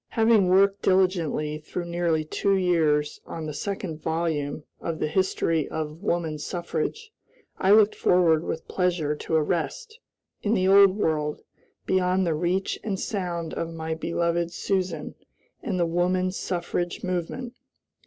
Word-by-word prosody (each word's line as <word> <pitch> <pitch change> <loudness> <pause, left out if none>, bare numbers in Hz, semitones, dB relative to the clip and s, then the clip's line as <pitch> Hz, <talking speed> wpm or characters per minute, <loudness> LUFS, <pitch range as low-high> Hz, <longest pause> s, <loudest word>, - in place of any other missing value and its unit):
Having 220 -4 +4
worked 195 +2 +4
diligently 175 -5 +1
through 175 +3 -5
nearly 170 -2 0
two 195 +5 +1
years 160 -5 +1
on 160 -1 -5
the 155 - -4
second 180 -3 -4
volume 160 -3 -2 0.2
of 165 -1 -3
"The 155 - -1
History 165 -3 0
of 155 +1 -5
Woman 170 -6 -1
Suffrage," 175 - -3 0.5
I 190 - +1
looked 210 0 +6
forward 170 -3 +3
with 160 - -4
pleasure 175 -5 0
to 160 - -2
a 155 - +4
rest, 435 - -3 0.4
in 215 +2 +1
the 185 -2 +2
Old 195 0 +6
World, 150 -5 -1 0.4
beyond 185 0 +2
the 165 - +1
reach 175 +5 -1
and 195 -3 -2
sound 175 -5 -3
of 165 - -3
my 160 -1 -4
beloved 170 +1 -1
Susan 180 -5 -2 0.5
and 195 -8 -2
the 170 - +3
woman 180 +2 +1
suffrage 175 -1 -3
movement. 185 +8 -3
175 Hz, 145 wpm, -25 LUFS, 160-190 Hz, 0.5 s, looked